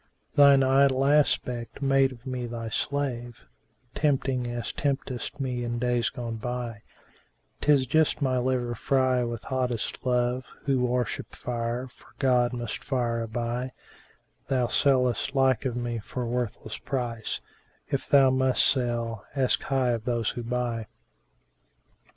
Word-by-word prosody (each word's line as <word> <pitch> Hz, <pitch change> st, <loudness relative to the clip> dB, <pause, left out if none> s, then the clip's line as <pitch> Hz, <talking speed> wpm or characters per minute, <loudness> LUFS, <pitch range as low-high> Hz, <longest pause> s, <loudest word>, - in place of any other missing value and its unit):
Thine 140 Hz, -1 st, +7 dB
idol 135 Hz, 0 st, +4 dB
aspect 130 Hz, -5 st, +1 dB
made 135 Hz, -1 st, +3 dB
of 125 Hz, 0 st, -13 dB
me 125 Hz, -2 st, -3 dB
thy 115 Hz, -1 st, -5 dB
slave, 120 Hz, -2 st, -2 dB, 0.2 s
* 125 Hz, -2 st, -41 dB
Tempting 135 Hz, -4 st, +1 dB
as 120 Hz, 0 st, -4 dB
temptedst 135 Hz, -2 st, -2 dB
me 125 Hz, -3 st, -2 dB
in 120 Hz, 0 st, -2 dB
days 120 Hz, -1 st, +1 dB
gone 115 Hz, -2 st, -5 dB
by: 120 Hz, -1 st, -4 dB, 0.8 s
'Tis 145 Hz, -3 st, +4 dB
just 155 Hz, +4 st, +2 dB
my 130 Hz, -3 st, +1 dB
liver 125 Hz, -1 st, 0 dB
fry 130 Hz, +1 st, +2 dB
with 120 Hz, -2 st, -4 dB
hottest 125 Hz, -4 st, -2 dB
love: 125 Hz, 0 st, 0 dB
* -, -, -27 dB
Who 135 Hz, -2 st, +2 dB
worship 125 Hz, -1 st, -2 dB
fire 120 Hz, +1 st, -3 dB
for 125 Hz, -, -20 dB
God 125 Hz, -3 st, +3 dB
must 120 Hz, -3 st, -4 dB
fire 120 Hz, -4 st, 0 dB
aby: 120 Hz, +3 st, -3 dB, 0.7 s
Thou 130 Hz, -2 st, +2 dB
sellest 130 Hz, 0 st, +2 dB
like 135 Hz, -1 st, +3 dB
of 125 Hz, -3 st, -1 dB
me 120 Hz, -1 st, -2 dB
for 125 Hz, +4 st, -5 dB
worthless 120 Hz, -2 st, -3 dB
price; 120 Hz, -4 st, -3 dB, 0.3 s
* -, -, -38 dB
If 140 Hz, -, -2 dB
thou 135 Hz, -2 st, +6 dB
must 130 Hz, 0 st, +3 dB
sell, 120 Hz, -4 st, 0 dB
ask 130 Hz, -2 st, +2 dB
high 130 Hz, -2 st, +1 dB
of 115 Hz, -1 st, -2 dB
those 120 Hz, -2 st, 0 dB
who 120 Hz, -, -5 dB
buy." 120 Hz, -2 st, -2 dB
125 Hz, 145 wpm, -27 LUFS, 120-130 Hz, 0.8 s, Thine